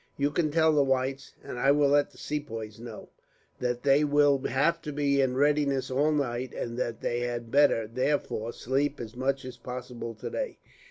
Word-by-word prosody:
You 145 +1 +1
can 155 0 +1
tell 160 +1 +3
the 150 - +4
whites, 135 0 -1
and 125 - -6
I 135 - +3
will 145 0 +4
let 145 0 +3
the - - -21
Sepoys 115 -8 -5
know, 115 -2 -9 0.5
that 125 -1 -2
they 140 +1 +4
will 145 -1 +4
have 165 +6 +1
to 150 - -5
be 140 -1 +2
in 130 -1 +1
readiness 140 -1 +2
all 145 +4 +2
night, 130 -4 -2
and 115 -1 -4
that 120 -2 -3
they 120 - -1
had 120 -1 -4
better, 140 -5 +4
therefore, 120 -1 -1
sleep 140 +4 -1
as 115 -1 -7
much 135 +1 -1
as 125 -1 -8
possible 125 -1 -7
today. - - -4
135 Hz, 185 wpm, -28 LUFS, 120-145 Hz, 0.5 s, the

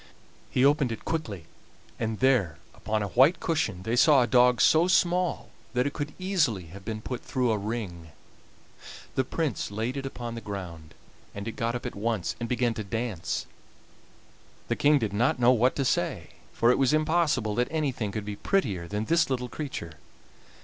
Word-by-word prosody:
He 130 - +2
opened 140 -3 +3
it 115 - -6
quickly, 110 - -3 0.5
and 110 -1 -2
there 115 - +3 0.2
upon 110 -1 -2
a 100 - -3
white 135 - +4
cushion 155 - -1
they 115 +4 -1
saw 140 0 +6
a - - +2
dog 125 -1 +4
so 160 +9 +5
small 180 -1 +1 0.2
that 125 +1 +2
it 145 - -2
could 145 -1 -5
easily 155 - 0
have 100 0 -10
been 110 +1 -5
put 125 -2 -4
through 125 -4 0
a 110 - +1
ring. 100 -6 -5 1.0
The 130 - +1
Prince 125 - -2
laid 110 +5 -3
it 135 -1 -3
upon 120 -3 -6
the 115 - -6
ground, 90 -7 -7 0.4
and 100 +2 -6
it - - -2
got 115 +2 -2
up 120 - -5
at - - -4
once 105 -3 -2
and 115 -1 -4
began 120 -1 +1
to 110 - -5
dance. 100 -5 -3 1.2
The - - +1
King 145 +1 +4
did 110 -6 -2
not 120 +6 +2
know 125 0 +5
what 125 +1 +3
to 135 - 0
say, - - -1 0.2
for 120 +1 +3
it 125 - +1
was 135 +1 +3
impossible 155 -8 +1
that 120 +3 +1
anything 135 -9 -2
could 105 0 -4
be 105 0 -4
prettier 100 - 0
than 105 +4 -3
this 165 +2 +2
little 125 -2 -2
creature. 120 - -6
120 Hz, 185 wpm, -27 LUFS, 105-140 Hz, 1.2 s, saw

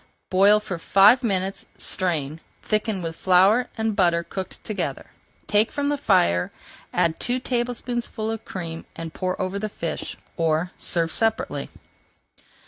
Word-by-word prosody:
Boil 200 +3 +6
for 190 -5 -5
five 205 +8 +6
minutes, 195 -4 -1
strain, 160 -4 0 0.2
thicken 215 -3 0
with 165 -1 -4
flour 190 +8 +4
and 220 -1 0
butter 170 -3 +3
cooked 190 +2 -6
together, 215 - -4 0.3
take 210 +2 +3
from 285 -1 -1
the 290 - +1
fire, 90 - +2 0.4
add 165 -1 +1
two 245 +1 0
tablespoonfuls 240 -2 -2
of 225 - -7
cream, 165 -3 -6
and 165 -1 -7
pour 185 -1 -2
over 185 +1 -2
the 215 +1 -3
fish, 165 -5 -4 0.2
or 165 +1 +1
serve 165 -2 0
separately. 225 +5 0
195 Hz, 135 wpm, -24 LUFS, 170-225 Hz, 0.4 s, Boil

